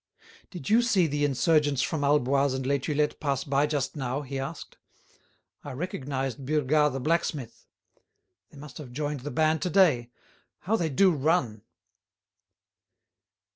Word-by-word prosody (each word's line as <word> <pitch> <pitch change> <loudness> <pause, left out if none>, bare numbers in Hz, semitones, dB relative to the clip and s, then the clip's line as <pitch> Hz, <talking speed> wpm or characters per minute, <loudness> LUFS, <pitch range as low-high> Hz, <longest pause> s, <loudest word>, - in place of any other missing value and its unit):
"Did 175 -8 -9
you 225 +3 +5
see 210 -7 +2
the 145 -1 -1
insurgents 145 0 +2
from 155 -3 -2
Alboise 140 -1 +2
and 130 -1 -4
Les 140 +1 +1
Tulettes 150 +2 -1
pass 140 -3 -1
by 140 +1 +1
just 145 -2 -2
now?" 135 0 -3
he 135 0 -5
asked. 135 - -7 0.8
"I 145 - -7
recognised 135 -3 -4
Burgat 150 0 +2
the 135 - -3
blacksmith. 150 -5 -2 0.8
They - - -16
must 145 +2 -10
have 130 -5 -10
joined 145 +1 -3
the 140 +4 -6
band 155 +3 +1
to 180 - -1
day. 155 -11 +3 0.5
How 210 +4 0
they 170 -7 0
do 185 +7 +4
run!" 140 -8 0
145 Hz, 145 wpm, -27 LUFS, 135-155 Hz, 0.8 s, you